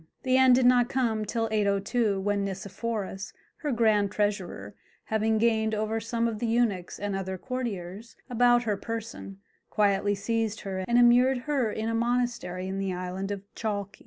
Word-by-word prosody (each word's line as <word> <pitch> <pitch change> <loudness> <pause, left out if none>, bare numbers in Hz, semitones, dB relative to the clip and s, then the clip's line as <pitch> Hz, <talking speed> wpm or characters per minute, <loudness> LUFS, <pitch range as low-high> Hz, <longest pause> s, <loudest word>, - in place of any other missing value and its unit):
The 255 -1 +2
end 260 -1 +6
did 255 0 +3
not 245 -1 +5
come 225 -5 0
till 225 +2 -1
802, 205 +1 +1
when 200 +1 0
Nicephorus, 195 0 -4 0.2
her 295 -3 -3
grand 215 -4 +2
treasurer, 200 - -2 0.3
having 220 0 +1
gained 220 -1 +2
over 215 +1 -1
some 230 +1 -1
of 220 -2 -3
the 235 - -1
eunuchs 225 -6 0
and 205 -1 -3
other 190 -1 -3
courtiers 225 -3 -5
about 245 -1 +3
her 210 -3 -1
person, 225 -2 -6 0.3
quietly 205 -1 +2
seized 220 +1 -2
her 190 -1 -4
and 240 - +3
immured 245 +1 +5
her 270 -7 0
in 220 +1 -3
a 230 - -1
monastery 235 -6 -1
in 190 +1 -3
the 195 -1 -1
island 185 +2 -4
of 200 -1 -4
Chalke. 200 -3 -4
220 Hz, 165 wpm, -27 LUFS, 200-235 Hz, 0.3 s, end